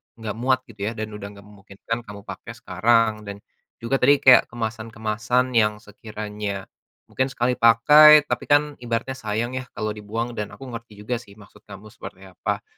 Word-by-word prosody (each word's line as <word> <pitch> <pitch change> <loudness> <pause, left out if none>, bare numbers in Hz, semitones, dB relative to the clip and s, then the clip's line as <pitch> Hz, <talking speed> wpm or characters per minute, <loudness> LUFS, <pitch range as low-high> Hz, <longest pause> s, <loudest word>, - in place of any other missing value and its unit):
enggak 110 -2 -6
muat 130 +1 +1
gitu, 100 -2 -5
ya? 115 - -4
Dan 110 -1 -5
udah 105 -1 -9
gak 100 - -14
memungkinkan 105 +3 -7
kamu 100 0 -10
pakai 115 - -9
sekarang 115 0 +2 0.2
dan 100 0 -8 0.3
juga 120 +4 -2
tadi 140 +2 +4
kayak 130 - +7
kemasan-kemasan 115 +2 -2
yang 105 -3 +2
sekiranya 105 -2 -6 0.5
mungkin 130 - 0
sekali 125 -1 -1
pakai, 150 +7 +7
tapi - - -4
kan 145 0 +2
ibaratnya 120 +2 -3
sayang 110 +3 -2
ya 130 0 -5
kalau 110 0 -2
dibuang 110 +3 -5
dan 105 -3 -4
aku - - -13
ngerti 115 -2 -9
juga 120 +2 -2
sih 100 -4 -16
maksud 105 0 -19
kamu 105 +1 -12
seperti 95 -1 -11
apa, 95 -2 -4
115 Hz, 175 wpm, -23 LUFS, 105-125 Hz, 0.5 s, kayak